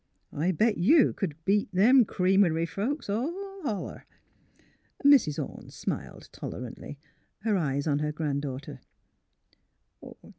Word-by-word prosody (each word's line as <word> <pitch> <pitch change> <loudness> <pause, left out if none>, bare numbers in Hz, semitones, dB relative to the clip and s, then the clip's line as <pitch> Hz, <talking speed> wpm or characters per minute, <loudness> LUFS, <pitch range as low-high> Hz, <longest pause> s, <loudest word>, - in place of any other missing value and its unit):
I 165 +6 0
bet 210 +5 +1
you 265 - +5
c'd 170 -7 -2
beat 205 +1 +1
them 230 +7 +5
creamery 185 -4 +2
folks 235 - -3
all 230 +10 -1 0.3
holler." 220 - -5 1.0
Mrs. 270 - +5
Ome - - -6
smiled, - - -6
tolerantly, 125 +3 -7 0.4
her 215 0 +1
eyes 140 -5 -1
on 145 -2 +1
her 150 0 -1
grand 150 -2 -2
daughter. 140 -1 -6
185 Hz, 115 wpm, -28 LUFS, 150-220 Hz, 1.0 s, you